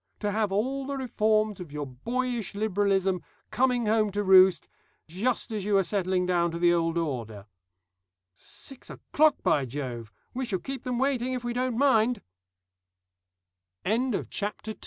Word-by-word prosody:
To 205 -1 0
have 210 -1 0
all 265 +7 -1
the 280 -1 -3
reforms 215 -5 +1
of 175 -5 -8
your 150 0 -4
boyish 230 - -3
liberalism 195 -3 +1 0.3
coming 245 +1 +2
home 215 -1 +2
to 205 0 0
roost, 190 -1 +6 0.4
just 225 +9 -1
as 210 -3 -3
you 205 0 +2
are 195 - +3
settling 185 -1 0
down 175 -1 +2
to 165 - -5
the 175 0 +4
old 165 0 0
order.... 115 -11 -3 0.9
"Six 260 - -11
o'clock, 310 0 +1
by 140 -3 +2
Jove! 120 -4 -6 0.2
We 260 +1 -2
shall 195 -5 -1
keep 270 +8 -6
them 250 -1 -1
waiting 260 -1 0
if 250 -1 -3
we 240 0 -2
don't 250 -1 -1
mind." 245 -4 +3 1.6
THE - - -2
USE - - +4 0.2
OF - - -3
IDEALS - - -3 0.3
"Ideals!" 215 - -4
205 Hz, 165 wpm, -27 LUFS, 175-245 Hz, 1.6 s, roost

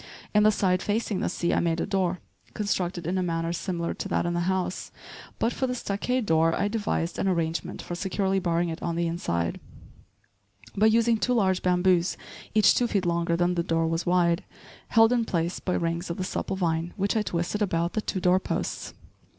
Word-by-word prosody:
In 210 - +5
the 215 0 +6
side 185 -3 +1
facing 210 -1 -1
the - - 0
sea, 170 - -1
I - - +2
made 170 -1 0
a - - 0
door, 185 -3 0 0.3
constructed 180 -4 -1
in 185 +3 0
a - - +1
manner 165 -1 -1
similar 175 -1 -2
to - - -5
that - - 0
in 175 - 0
the 175 - 0
house; 190 -1 -2 0.5
but, 230 - 0
for 260 - -1
the 250 - -2
stockade 245 +3 -1
door, 165 -1 +3
I 205 - 0
devised 205 -6 -2
an - - 0
arrangement 165 -3 -1
for - - -6
securely 190 +2 0
barring 170 -1 0
it 165 +1 -5
on 170 - -2
the 170 0 0
inside, 85 - -2 1.2
by 215 +2 +4
using 230 +1 +3
two 250 +3 +1
large 190 -5 +2
bamboos 180 -1 +2 0.4
each 210 -2 +6
two 245 - +2
feet 200 -5 0
longer 170 0 +1
than 175 +1 +2
the 170 - 0
door 165 -1 0
was 165 +1 -1
wide, 175 0 +2 0.4
held 225 0 +5
in 240 -1 +2
place 170 -4 -1
by 180 - -1
rings 170 +1 -2
of 170 - -3
the 185 - -2
supple 190 - -3
vine 170 -2 -1
which 200 +3 0
I 220 - +3
twisted 175 +1 -2
about 170 -4 0
the 215 - 0
two 195 - -3
door 180 +1 +3
posts. - - -4
180 Hz, 205 wpm, -26 LUFS, 170-205 Hz, 1.2 s, the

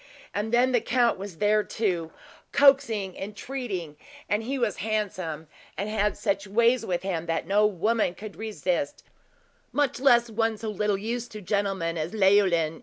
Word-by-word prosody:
And 210 +2 -2
then 245 +2 +4
the 245 -3 +3
count 235 -2 +2
was 195 -4 -7
there, 210 +2 +3
too, 180 -9 -2 0.4
coaxing 230 -9 +4
and 195 - -5
entreating; 195 - -5 0.3
and 205 +1 +1
he 265 +5 -3
was 235 -6 0
handsome 185 -7 -3 0.3
and 200 +2 -2
had 210 -1 0
such 200 -1 -1
ways 235 +5 +3
with 180 -5 -2
him 170 -3 -3
that 165 0 -1
no 210 +2 +4
woman 210 0 0
could 210 -1 -9
resist, 180 -8 -2 0.7
much 290 -4 0
less 240 -3 +5
one 225 0 0
so 220 +1 -4
little 210 0 0
used 235 +4 -4
to 215 - -6
gentlemen 190 -4 -1
as 155 +5 -3
Leoline. 190 -6 +3
210 Hz, 165 wpm, -26 LUFS, 185-230 Hz, 0.7 s, less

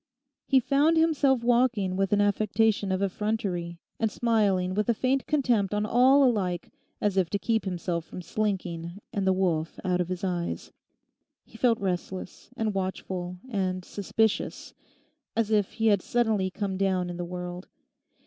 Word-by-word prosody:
He 270 - +5
found 285 +6 +3
himself 290 -6 +3
walking 235 -6 +2
with 195 0 0
an 205 0 +4
affectation 205 0 +2
of 190 +1 0
effrontery, 190 -4 -2 0.2
and 225 - +2
smiling 200 -6 +1
with 210 +4 0
a 235 - +3
faint 260 +3 0
contempt 240 -9 +1
on 210 0 0
all 260 +5 +5
alike, 195 -9 0 0.3
as 205 -2 0
if 180 -3 +2
to 200 - 0
keep 225 +2 0
himself 175 -2 -2
from 180 +2 -9
slinking, 175 -3 -2 0.2
and 195 -1 -1
the - - +5
wolf 170 -4 0
out 180 -1 +1
of 175 - -3
his 185 0 -4
eyes. 175 -2 -3 0.7
He - - -21
felt 235 -3 +2
restless, 185 -1 -4
and 220 -3 0
watchful, 185 -1 -3
and 185 -5 -2
suspicious, 215 +2 -1 0.6
as 225 -1 +1
if 205 -3 +2
he 225 - -2
had 205 -4 +4
suddenly 220 -5 +1
come 195 0 -3
down 185 -2 0
in 175 - -6
the 175 - -3
world. 180 +1 -6
200 Hz, 160 wpm, -27 LUFS, 185-225 Hz, 0.7 s, He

